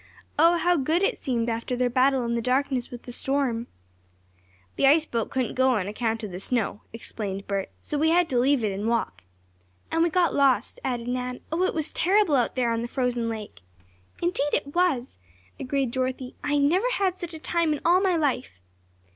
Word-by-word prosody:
Oh, 335 +2 +6
how 350 +1 +2
good 315 +6 +1
it 460 +5 +2
seemed 240 -4 -2
after 230 +2 -2
their 250 0 +1
battle 255 +1 +2
in 235 - -1
the 235 - 0
darkness 255 0 0
with 245 -1 -9
the 245 - -8
storm! 245 -3 0 1.1
"The 275 - +3
ice 310 +3 +5
boat 230 -6 -2
couldn't 255 -3 -1
go 260 0 +3
on 195 -4 -1
account 225 +1 -2
of 210 - -5
the 180 - -6
snow," 215 -1 -1
explained 200 -3 -5
Bert, 195 -1 -2
"so 295 - -3
we 320 +2 +3
had 350 +1 +4
to 250 - +1
leave 265 0 +3
it 210 - +1
and 200 +3 -3
walk." 230 - -1 0.7
"And 325 - +1
we 340 - +4
got 350 +1 +2
lost," 265 -5 +2
added 245 -2 -2
Nan. 250 0 -3
"Oh, 330 +3 0
it - - -1
was 315 -1 -1
terrible 375 -3 +3
out 245 -3 +1
there 245 -2 +1
on 230 0 -1
the 235 - -3
frozen 245 -2 -1
lake!" 215 - -7 0.6
"Indeed 295 -4 +1
it 285 - -3
was," 305 - 0 0.4
agreed 265 -1 -1
Dorothy. 255 0 -3
"I 290 0 +1
never 345 +12 +2
had 375 -4 0
such 345 -1 -6
a - - -7
time 335 0 0
in 300 - -1
all 355 +3 +5
my 380 -3 +2
life." 265 - -1
260 Hz, 205 wpm, -26 LUFS, 235-315 Hz, 1.1 s, Oh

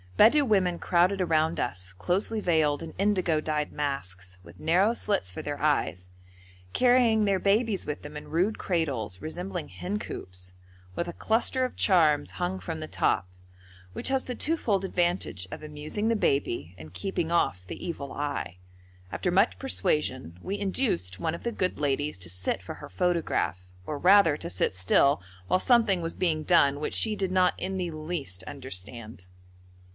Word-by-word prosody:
Bedou 285 +7 +6
women 190 -6 +2
crowded 180 +4 +2
around 160 -2 +1
us, 95 -5 -3
closely 190 - 0
veiled 160 -6 +2
in 165 - -7
indigo 185 -6 +2
dyed 150 -1 -1
masks, 95 -11 -4
with 85 +1 -15
narrow 185 +7 +3
slits 200 - -1
for 90 - -6
their 145 -1 -4
eyes, 90 - 0 0.6
carrying 245 -4 +4
their 195 -2 +2
babies 205 +1 +1
with 150 0 -4
them 145 +1 -9
in 150 - -7
rude 185 +7 +1
cradles 135 - -1
resembling 175 - -5
hencoops, 90 - -6 0.4
with 170 - -2
a 175 - -5
cluster 240 +6 +1
of 255 - -6
charms 160 -7 +3
hung 180 +1 -3
from 165 -3 -5
the 155 - -5
top, 90 - +1 0.7
which - - -1
has 265 -1 +1
the 250 - -5
twofold 225 - 0
advantage 175 - -1
of - - -7
amusing 155 +8 -4
the 230 - +3
baby 120 - 0
and 80 +1 -11
keeping 170 - -2
off 90 - +1
the - - -8
evil 155 -6 -5
eye. 145 -10 -3 0.5
After 90 - -1
much 95 - +3
persuasion 95 - -1
we 200 +2 -3
induced 195 - 0
one 160 -1 -1
of - - -10
the 235 - -1
good 185 -4 -1
ladies 145 -1 0
to 90 -1 -5
sit 90 +1 -1
for - - -7
her - - -10
photograph, 125 - 0 0.2
or 150 - -3
rather 180 -2 +6
to - - -5
sit 95 +1 0
still 95 +6 +3 0.3
while 185 - +3
something 225 -6 +4
was 165 0 -3
being 160 -4 0
done 145 -5 +4
which 150 - -2
she 220 -2 +2
did 190 -3 -1
not 185 -1 +4
in 190 0 -2
the 180 -2 -2
least 155 - -4
understand. 110 -4 -6
160 Hz, 170 wpm, -28 LUFS, 130-190 Hz, 0.7 s, Bedou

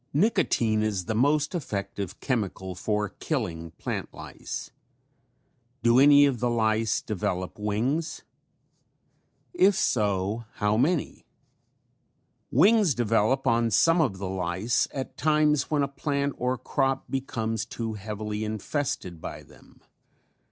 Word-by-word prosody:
Nicotine 120 - +2
is 105 -4 -1
the 110 - -2
most 145 - +2
effective 100 - -4
chemical 100 -7 -2
for 105 +3 -1
killing 90 - -3
plant - - -4
lice. - - -7 1.1
Do 120 +2 +5
any 145 +1 +7
of 135 -4 0
the 120 - +1
lice 110 -1 +1
develop 95 -3 -3
wings? 120 +11 -1 1.3
If 205 - +4
so, 105 - 0
how 105 0 +1
many? 145 +8 0 1.2
Wings 195 - +4
develop 115 +1 +1
on 115 0 +2
some 165 - +4
of 115 -11 0
the 95 0 -4
lice 95 +5 0
at 135 -1 -6
times 150 -2 +2
when 150 -2 +2
a - - +1
plant 140 0 -2
or 125 +1 0
crop 135 0 -1
becomes 115 -5 -2
too 115 -1 -5
heavily 105 +1 -4
infested 110 - -3
by - - -7
them. - - -20
115 Hz, 120 wpm, -26 LUFS, 105-140 Hz, 1.3 s, any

